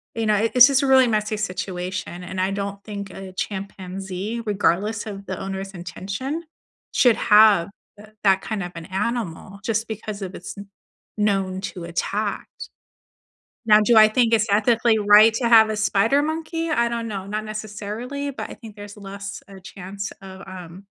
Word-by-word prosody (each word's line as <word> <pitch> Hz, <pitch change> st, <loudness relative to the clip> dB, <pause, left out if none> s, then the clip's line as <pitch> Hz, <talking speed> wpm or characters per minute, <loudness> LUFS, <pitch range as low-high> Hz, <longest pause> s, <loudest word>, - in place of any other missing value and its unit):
you 225 Hz, -1 st, -1 dB
know, 215 Hz, -1 st, +3 dB
i 220 Hz, +2 st, +1 dB
it's 250 Hz, 0 st, +10 dB
just 275 Hz, -1 st, +2 dB
a -, -, +1 dB
really 260 Hz, -2 st, +6 dB
messy 215 Hz, -1 st, 0 dB
situation 185 Hz, -2 st, -4 dB
and 185 Hz, +1 st, -6 dB
I 190 Hz, -, 0 dB
don't 200 Hz, 0 st, -4 dB
think 200 Hz, -2 st, -6 dB
a 190 Hz, 0 st, -9 dB
chimpanzee, 195 Hz, +2 st, -5 dB
regardless 205 Hz, +1 st, 0 dB
of 200 Hz, -2 st, -7 dB
the 190 Hz, -2 st, -5 dB
owner's 195 Hz, 0 st, -5 dB
intention, 200 Hz, -, -5 dB, 0.5 s
should 245 Hz, -3 st, +5 dB
have 210 Hz, -4 st, +5 dB, 0.3 s
th 210 Hz, +1 st, -14 dB
that 195 Hz, -1 st, +4 dB
kind 215 Hz, -4 st, -4 dB
of 175 Hz, -, -6 dB
an 165 Hz, -1 st, -7 dB
animal 200 Hz, -2 st, -3 dB
just 225 Hz, 0 st, -1 dB
because 215 Hz, -1 st, -6 dB
of 190 Hz, -1 st, -6 dB
it's -, -, -8 dB
kn 200 Hz, 0 st, -10 dB, 0.5 s
known 195 Hz, -3 st, 0 dB
to 180 Hz, -, -9 dB
attacked. 200 Hz, +4 st, -4 dB, 1.0 s
Now 210 Hz, -1 st, +7 dB
do 230 Hz, +2 st, +3 dB
I 215 Hz, 0 st, +9 dB
think 230 Hz, 0 st, +2 dB
it's 220 Hz, 0 st, +3 dB
ethically 230 Hz, +2 st, +3 dB
right 210 Hz, +2 st, +7 dB
to 235 Hz, -1 st, 0 dB
have 220 Hz, -1 st, +7 dB
a 215 Hz, -, -2 dB
spider 220 Hz, +6 st, +2 dB
monkey? 325 Hz, +1 st, -3 dB
I 235 Hz, -6 st, +2 dB
don't 235 Hz, -1 st, -3 dB
know. 195 Hz, -3 st, -5 dB
Not 215 Hz, +1 st, -3 dB
necessarily, 215 Hz, +6 st, -5 dB
but -, -, -6 dB
I -, -, -7 dB
think 220 Hz, -4 st, -12 dB
there's 205 Hz, 0 st, -10 dB
less 200 Hz, 0 st, -8 dB
a 195 Hz, -1 st, -12 dB
chance 195 Hz, +1 st, -7 dB
of, 190 Hz, 0 st, -11 dB
um, 185 Hz, 0 st, -10 dB
205 Hz, 175 wpm, -23 LUFS, 195-225 Hz, 1.0 s, it's